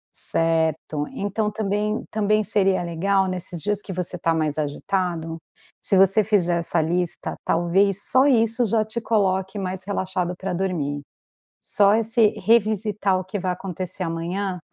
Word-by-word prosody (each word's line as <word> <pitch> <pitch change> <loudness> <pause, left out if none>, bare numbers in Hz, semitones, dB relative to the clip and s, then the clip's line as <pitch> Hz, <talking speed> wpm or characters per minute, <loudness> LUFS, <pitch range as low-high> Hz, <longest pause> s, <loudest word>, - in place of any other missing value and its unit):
Certo, 160 -2 0
então 210 +2 -2
também 210 0 -1
também 215 0 +1
seria 195 -2 +2
legal 190 +3 +1
nesses 180 -3 -4
dias 205 -1 -1
que 195 - -7
você 180 0 -1
está 165 -1 0
mais 155 -2 -1
agitado, 165 +2 -2 0.4
se 195 - +1
você 195 +3 +5
fizer 185 -5 +1
essa 170 0 0
lista, 175 +2 -2
talvez 190 +4 +2
só 260 +2 +5
isso 230 -2 +3
já 220 +1 +1
te 220 +2 -5
coloque 190 -3 0
mais 190 -1 -4
relaxado 185 -3 -2
pra 190 +1 -4
dormir. 170 -6 -2 0.6
Só 205 0 +3
esse 225 0 +3 0.2
revisitar 210 -3 +2
o - - -5
que 190 +3 -5
vai 185 0 -1
acontecer 185 0 -2
amanhã, 180 +3 -3
190 Hz, 145 wpm, -23 LUFS, 175-210 Hz, 0.6 s, você